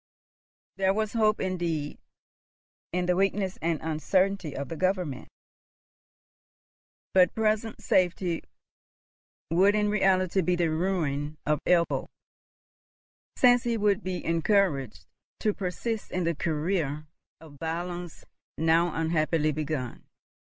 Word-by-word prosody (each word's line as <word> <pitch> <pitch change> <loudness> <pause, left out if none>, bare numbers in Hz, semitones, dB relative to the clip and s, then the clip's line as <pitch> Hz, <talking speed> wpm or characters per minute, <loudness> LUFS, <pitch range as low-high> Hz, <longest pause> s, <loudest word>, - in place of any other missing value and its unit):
There 190 0 +2
was 215 -1 -1
hope 215 -2 +2
indeed 170 -5 -2 0.9
in 180 +1 0
the 180 0 +2
weakness 195 0 0
and 165 -2 0
uncertainty 175 +2 0
of 140 0 -4
the 165 - -5
Government; 180 -6 -1 1.9
but 180 -2 +5
present 220 0 0
safety 180 -2 +1 1.1
would 195 +5 +4
in 210 -1 +1
reality 190 -2 +2
be 180 +1 +1
the 170 -2 +1
ruin 155 -4 -1
of 150 -1 +1
Ebbo, 170 -1 +2 1.3
since 245 -1 +5
he 235 -1 0
would 210 -1 +1
be 185 -2 -4
encouraged 160 - +1 0.4
to 215 - +2
persist 205 +4 -3
in 180 - -2
the 170 0 +1
career 155 -1 -1 0.3
of 145 -3 -15
violence 175 +1 -5 0.3
now 165 +1 +2
unhappily 160 -1 +1
begun. 150 -4 -4
175 Hz, 110 wpm, -27 LUFS, 155-195 Hz, 1.9 s, but